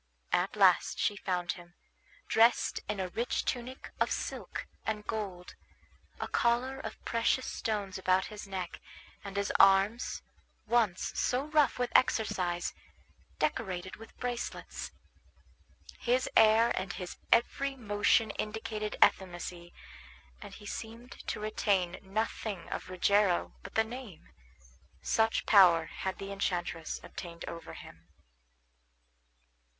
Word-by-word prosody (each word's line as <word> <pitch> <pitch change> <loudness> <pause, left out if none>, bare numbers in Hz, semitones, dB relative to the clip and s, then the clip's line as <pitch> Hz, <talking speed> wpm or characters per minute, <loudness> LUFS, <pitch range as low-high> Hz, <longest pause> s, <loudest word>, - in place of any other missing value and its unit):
At - - +2
last - - +4
she 205 - +1
found 180 -3 -1
him, 175 0 -11 0.5
dressed 230 +2 +4
in 210 -1 -2
a 185 -1 -2
rich 235 +6 -1
tunic 255 +1 -4
of - - +2
silk - - -4 0.2
and 210 -1 -3
gold, 195 -5 -4 0.7
a - - -2
collar 245 +3 +1
of - - -8
precious 230 +2 +1
stones 205 -4 -3
about 185 0 +2
his 210 -1 -8
neck, 185 -3 -5 0.4
and 200 -1 -6
his 200 0 0
arms, 195 +4 +4 0.4
once 220 -5 +1
so 255 +2 +1
rough 300 -3 +3
with 245 -1 -1
exercise, 180 -8 +2 0.6
decorated 185 -9 -2
with 225 +1 -14
bracelets. 245 -1 -4 1.1
His 250 +1 +1
air 220 +1 +6
and 190 - -3
his 180 -2 -6
every 275 +4 +2
motion 210 -1 +2
indicated 215 -1 -4
effeminacy, 175 -1 -4 0.7
and - - -9
he 210 - -12
seemed 230 +3 -7 0.2
to - - -2
retain 200 -4 0
nothing 205 -2 -3
of - - -5
Rogero 185 0 +2
but 200 - -11
the 220 - +5
name; 230 -5 -9 0.7
such 225 0 +2
power 175 -6 +7
had 190 +3 -4
the 195 0 -6
enchantress 175 -4 -2
obtained 170 -2 -8
over 165 0 -7
him. - - -12
205 Hz, 120 wpm, -31 LUFS, 185-230 Hz, 1.1 s, power